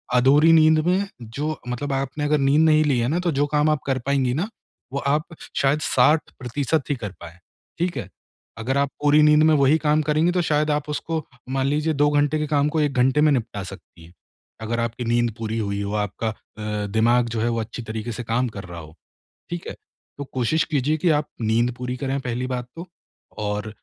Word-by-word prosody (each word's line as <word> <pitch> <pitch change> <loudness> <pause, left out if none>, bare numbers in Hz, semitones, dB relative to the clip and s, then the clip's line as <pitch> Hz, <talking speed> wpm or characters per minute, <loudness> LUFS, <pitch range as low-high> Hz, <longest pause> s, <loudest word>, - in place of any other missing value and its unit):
अधूरी 140 +6 +5
नींद 160 -1 +6
में 190 +3 +2 0.2
जो 145 +8 -4
मतलब 135 +3 -3
आपने 135 +2 -2
अगर 150 +1 +2
नींद 140 +3 +3
नहीं 155 -1 +5
ली 135 -4 +2
है 115 - +1
ना 170 - 0
तो 180 -1 0
जो 145 - +3
काम 150 +1 +3
आप 155 -1 +1
कर 130 -1 0
पाएँगी 135 -3 +1
ना, 180 - -2 0.4
वो 140 - -1
आप 150 +5 -1
श - - -10
शायद 140 +2 +2
60% 140 +1 +1
ही 145 - +1
कर 105 -6 -6
पाएँ। 85 0 -11 0.4
ठीक 175 +1 -1
है? - - -5 0.5
अगर 130 +5 -1
आप 140 0 +1
पूरी 150 +1 +5
नींद 150 0 +5
में 155 0 +5
वही 140 +2 +4
काम 155 0 +2
करेंगी 155 +3 +2
तो 180 0 +1
शायद 150 -2 +1
आप 150 0 -2
उसको 160 +1 -3 0.3
मान 135 0 0
लीजिए 150 +3 0
2 145 0 +3
घंटे 145 +1 +2
के 150 - -1
काम 145 -1 +2
को 160 - +1
1 145 -2 0
घंटे 130 +4 +3
में 155 - +5
निपटा 110 -5 -2
सकती 95 -3 -12
हैं 85 - -18 0.5
अगर 115 +1 -2
आपकी 115 +1 -3
नींद 120 0 +1
पूरी 110 0 -3
हुई 100 -1 -2
हो, 100 0 -3
आपका 105 +2 -2
अ, 105 -1 -5
दिमाग 115 +3 +2
जो 115 -1 -2
है 120 - +1
वो 115 0 -1
अच्छी 110 +3 -6
तरीके 110 +1 -5
से 120 +2 -5
काम 120 +3 0
कर 100 - -6
रहा 85 -1 -8
हो। 80 0 -12 0.6
ठीक 175 0 -5
है? - - -5 0.4
तो 140 - -4
कोशिश 130 +6 +1
कीजिए 145 +3 +1
कि 170 +2 +2
आप 150 - -10
नींद 115 +2 +1
पूरी 125 0 -4
करें 135 +1 -2
पहली 125 0 -3
बात 125 -1 -4
तो 170 +2 -7 0.6
और 105 +1 -2
135 Hz, 220 wpm, -23 LUFS, 115-150 Hz, 0.6 s, नींद